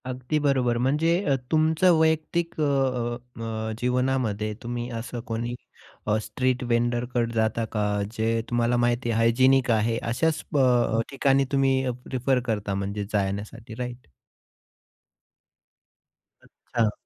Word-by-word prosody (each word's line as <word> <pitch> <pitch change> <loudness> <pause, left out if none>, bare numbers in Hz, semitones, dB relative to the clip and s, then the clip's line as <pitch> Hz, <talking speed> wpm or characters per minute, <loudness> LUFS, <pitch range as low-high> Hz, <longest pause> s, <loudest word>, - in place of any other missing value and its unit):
अगदी 130 +3 -2
बरोबर, 130 -5 +2
म्हणजे 150 +7 +2 0.2
अ, 140 - +4 0.2
तुमच्या 160 +3 +4
वैयक्तिक 160 +1 +1
अ, - - +3
अ, 130 -4 0 0.3
अ, 110 -1 -3
जीवनामध्ये 125 -4 0
तुम्ही 120 0 -4
असं 120 +1 -6
कोणी 115 +1 -3 0.5
अ, 105 0 +3
स्ट्रीट 130 +3 -1
व्हेंडरकडे 120 0 0
जाता 110 0 0
का, 105 -1 -1 0.3
जे 115 +1 +1
तुम्हाला 120 0 +1
माहिती 120 0 +1
आहे 115 - +1
हायजिनिक 130 +3 +4
आहे? 115 +1 +2
अशाच 155 +8 0
अ, 120 -4 +3
ठिकाणी 135 0 +2
तुम्ही 135 -1 +2 0.2
प्रिफर 130 0 0
करता 105 -2 -1
म्हणजे 100 +1 -3
जाण्यासाठी, 105 +3 -3
राईट? 125 - -7 2.3
अच्छा. 115 -3 -2
120 Hz, 120 wpm, -25 LUFS, 115-135 Hz, 2.3 s, अ